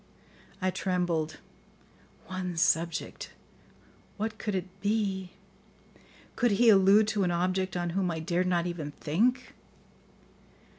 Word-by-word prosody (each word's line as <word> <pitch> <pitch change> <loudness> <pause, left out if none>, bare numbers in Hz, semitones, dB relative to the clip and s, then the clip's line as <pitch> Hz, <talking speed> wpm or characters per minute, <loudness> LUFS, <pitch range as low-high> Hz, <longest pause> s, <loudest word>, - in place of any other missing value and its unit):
I 185 - +2
trembled. 175 -5 -1 0.9
One 185 -1 -4
subject! 165 +1 0 0.8
What 220 +1 -3
could 210 -2 -2
it 185 -2 -1 0.2
be? 200 -3 -1 1.1
Could 240 -4 +2
he 230 +3 +5
allude 200 +1 +6
to 210 -2 0
an 180 - +1
object 185 +1 0
on 175 -1 -2
whom 185 0 0
I 165 -1 -3
dared 175 +2 0
not 175 -1 +1
even 160 -5 -4
think? 240 - 0
185 Hz, 115 wpm, -29 LUFS, 175-205 Hz, 1.1 s, allude